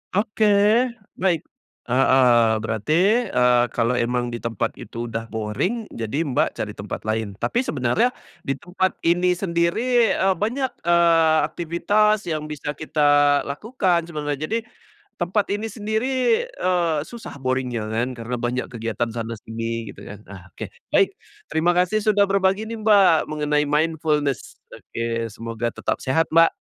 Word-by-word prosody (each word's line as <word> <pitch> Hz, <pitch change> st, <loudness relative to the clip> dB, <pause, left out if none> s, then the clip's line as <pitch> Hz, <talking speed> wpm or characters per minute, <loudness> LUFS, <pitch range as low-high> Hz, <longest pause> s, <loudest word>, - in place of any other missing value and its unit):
Oke, 215 Hz, +1 st, +1 dB, 0.7 s
baik. 175 Hz, -4 st, +1 dB, 0.4 s
Heeh, 125 Hz, -3 st, +4 dB
berarti, 170 Hz, -, +2 dB
eee, 125 Hz, -5 st, +3 dB
kalau 115 Hz, +1 st, +2 dB
emang 120 Hz, 0 st, -1 dB
di 120 Hz, -, -4 dB
tempat 115 Hz, -3 st, -2 dB
itu 120 Hz, +1 st, -6 dB
udah 115 Hz, -1 st, -4 dB
boring, 110 Hz, -, -2 dB
jadi 115 Hz, +8 st, -2 dB
Mbak 140 Hz, -6 st, 0 dB
cari -, -, -4 dB
tempat -, -, -6 dB
lain. 110 Hz, -2 st, -2 dB
Tapi 235 Hz, -, -1 dB
sebenarnya 240 Hz, -2 st, +1 dB, 0.4 s
di 135 Hz, -, -1 dB
tempat 180 Hz, +5 st, -2 dB
ini 180 Hz, +2 st, +3 dB
sendiri, 195 Hz, +7 st, +1 dB
eee, 190 Hz, 0 st, +2 dB
banyak, 245 Hz, +8 st, -1 dB
eee, 165 Hz, -2 st, +4 dB
aktivitas 205 Hz, +6 st, +1 dB
yang 155 Hz, -2 st, -2 dB
bisa 150 Hz, -1 st, -4 dB
kita 145 Hz, -2 st, +3 dB
lakukan 180 Hz, -, 0 dB
sebenarnya. 150 Hz, -4 st, -3 dB
Jadi, 225 Hz, -, 0 dB, 0.6 s
tempat 190 Hz, +4 st, 0 dB
ini 215 Hz, +2 st, -4 dB
sendiri, 220 Hz, +2 st, -2 dB, 0.4 s
eee, 175 Hz, -, 0 dB
susah 235 Hz, -9 st, -9 dB
boring-nya 130 Hz, -3 st, -1 dB
kan, 120 Hz, +3 st, -1 dB
karena 115 Hz, +2 st, -4 dB
banyak 120 Hz, +1 st, -2 dB
kegiatan 115 Hz, +1 st, -2 dB
sana 115 Hz, 0 st, -4 dB
sini, 115 Hz, 0 st, -5 dB
gitu -, -, -15 dB
kan, 105 Hz, +1 st, -10 dB
nah 95 Hz, -4 st, -12 dB
oke. -, -, -8 dB, 0.3 s
Baik, -, -, +4 dB, 0.4 s
terima 165 Hz, +3 st, +2 dB
kasih 180 Hz, +4 st, +2 dB
sudah 205 Hz, -1 st, +5 dB
berbagi 195 Hz, +1 st, +1 dB
nih 225 Hz, 0 st, -6 dB
Mbak, 200 Hz, -6 st, +4 dB
mengenai 150 Hz, -1 st, 0 dB
mindfulness. 150 Hz, -2 st, 0 dB, 0.2 s
Oke, 115 Hz, 0 st, -4 dB
semoga 115 Hz, +2 st, -4 dB
tetap -, -, -2 dB
sehat, 160 Hz, +6 st, +1 dB
Mbak. 165 Hz, +1 st, +6 dB
155 Hz, 140 wpm, -22 LUFS, 120-190 Hz, 0.7 s, Mbak